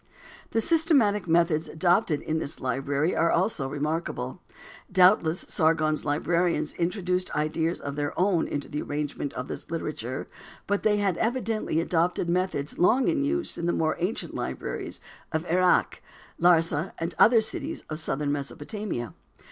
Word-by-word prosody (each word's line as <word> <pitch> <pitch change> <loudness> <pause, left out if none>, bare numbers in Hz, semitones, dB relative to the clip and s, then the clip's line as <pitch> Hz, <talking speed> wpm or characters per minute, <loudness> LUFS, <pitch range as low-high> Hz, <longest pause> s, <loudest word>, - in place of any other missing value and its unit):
The 225 - +1
systematic 270 - +3
methods 165 -1 +2
adopted 170 -1 +2
in 160 +1 -1
this 140 - -4
library 140 +6 0
are 165 +1 +3
also 175 -6 +1
remarkable. 150 -1 -3 0.5
Doubtless 180 -3 +4
Sargon's 155 -1 +1
librarians 160 +1 0
introduced 180 +1 -1
ideas 160 +3 0
of 140 0 -5
their 145 0 -1
own 180 -3 +2
in 145 - -2
the 150 +1 -5
arrangement 145 -1 -3
of 125 - -5
this - - -7
literature, 150 -6 -4 0.4
but 205 0 0
they 210 -1 +3
had 195 -4 +1
evidently 225 -7 0
adopted 170 +1 0
methods 180 -6 -1
long 245 +9 +4
in 310 -4 +1
use 335 +4 -1
in 170 - -1
the 175 - +2
more 160 -1 +1
ancient 180 +6 -2
libraries - - -5 0.3
of 160 +1 -1
Erech, 180 +1 +2 0.4
Larsa 165 -1 +3
and 165 +1 -3
other 230 +1 +7
cities 290 +9 -4
of 155 0 -5
southern 145 -2 -2
Mesopotamia. 145 - -4
170 Hz, 145 wpm, -27 LUFS, 150-190 Hz, 0.5 s, other